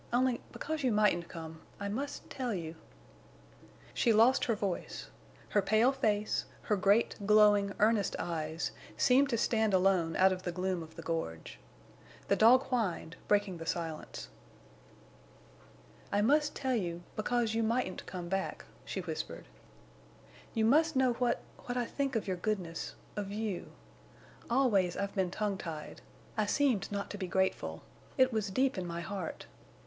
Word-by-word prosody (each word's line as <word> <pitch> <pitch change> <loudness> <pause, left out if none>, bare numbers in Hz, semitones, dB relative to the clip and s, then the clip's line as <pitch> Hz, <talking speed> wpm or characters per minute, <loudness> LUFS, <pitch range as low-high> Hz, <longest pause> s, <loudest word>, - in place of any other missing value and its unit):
Only—because 255 +5 -1
you 255 -3 +2
mightn't 210 -5 +3
come—I 160 +4 -8
must 270 +8 -4
tell 250 -5 -3
you—" 165 -3 -5 1.2
She 235 - +3
lost 225 +4 +5
her 230 - +1
voice. 200 -4 -4 0.4
Her 205 - +3
pale 220 +6 +4
face, 215 -6 0 0.2
her 210 - +1
great, 200 +4 +3
glowing, 210 -1 +5
earnest 210 -2 +3
eyes, 160 -1 -3 0.3
seemed 270 +2 +4
to 235 - +1
stand 220 -3 +2
alone 180 -3 +3
out 190 +1 +5
of 185 - -5
the 180 - -3
gloom 185 0 -1
of 160 0 -11
the - - -8
gorge. 80 - -4 0.7
The 200 - +5
dog 240 +5 +6
whined, 195 -9 -2
breaking 205 -3 +2
the 165 0 -8
silence. 165 -2 -4 1.8
"I 205 +1 +2
must 295 +5 +3
tell 265 -2 -1
you—because 215 +5 -1
you 225 - +1
mightn't 225 -3 -1
come 180 -2 -5
back," 195 +2 -2 0.2
she - - -4
whispered. - - -5 1.1
"You 220 -1 +3
must 310 +6 +4
know 260 -2 +4
what—what 245 +1 -2
I 245 - +1
think 275 +1 -2
of 220 - -1
your 185 -1 -1
goodness—of 195 +1 -4
you. 210 -3 -3 0.8
Always 215 -9 +3
I've 200 0 -2
been 190 -2 +1
tongue 200 0 -2
tied. 155 -3 -7 0.4
I 215 -1 +1
seemed 260 -6 +1
not 200 -1 -3
to 205 - -6
be 185 - -2
grateful. 190 +1 -1 0.3
It 260 -2 +4
was 215 -2 0
deep 255 +2 +1
in 180 - -4
my 170 0 -4
heart. 185 -1 -5
205 Hz, 145 wpm, -32 LUFS, 180-235 Hz, 1.8 s, dog